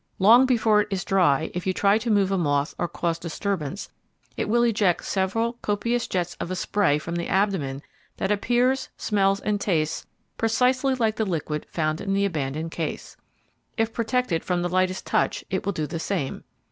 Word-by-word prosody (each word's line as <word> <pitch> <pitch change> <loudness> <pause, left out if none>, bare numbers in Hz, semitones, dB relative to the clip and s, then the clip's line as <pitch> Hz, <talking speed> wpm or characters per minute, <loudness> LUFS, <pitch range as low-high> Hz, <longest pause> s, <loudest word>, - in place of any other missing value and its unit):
Long 235 +7 +6
before 220 -4 +4
it - - -3
is 190 -3 -3
dry 160 -6 +2
if 180 +1 -4
you 185 - +2
try 200 +3 +3
to 235 +1 -3
move 200 -3 +3
a 195 - +1
moth 145 -2 0
or 175 - 0
cause 170 -1 -2
disturbance, 175 +1 -3 0.5
it - - -2
will 235 +2 +3
eject 210 -6 +2
several 225 +5 -1
copious 230 +4 -1
jets 175 -2 -2
of - - -4
a 185 - -2
spray 185 -5 +1
from 170 +4 -4
the 170 - -3
abdomen 180 -9 0 0.3
that 190 - -1
appears, 245 +5 +1
smells 195 -2 +1
and 205 -1 -1
tastes 155 -6 -1 0.3
precisely 255 +4 +2
like 220 -3 0
the 220 - +1
liquid 160 -6 -3
found 155 -1 -1
in 195 -1 -1
the 200 0 +2
abandoned 155 -2 -3
case. 165 -2 -5 0.6
If 225 0 0
protected 230 -6 0
from 180 -1 -1
the 175 - -1
lightest 185 +1 0
touch - - 0
it 190 0 -2
will - - +2
do 155 - -2
the 160 +3 -5
same. 165 -6 -3
195 Hz, 185 wpm, -25 LUFS, 170-220 Hz, 0.6 s, Long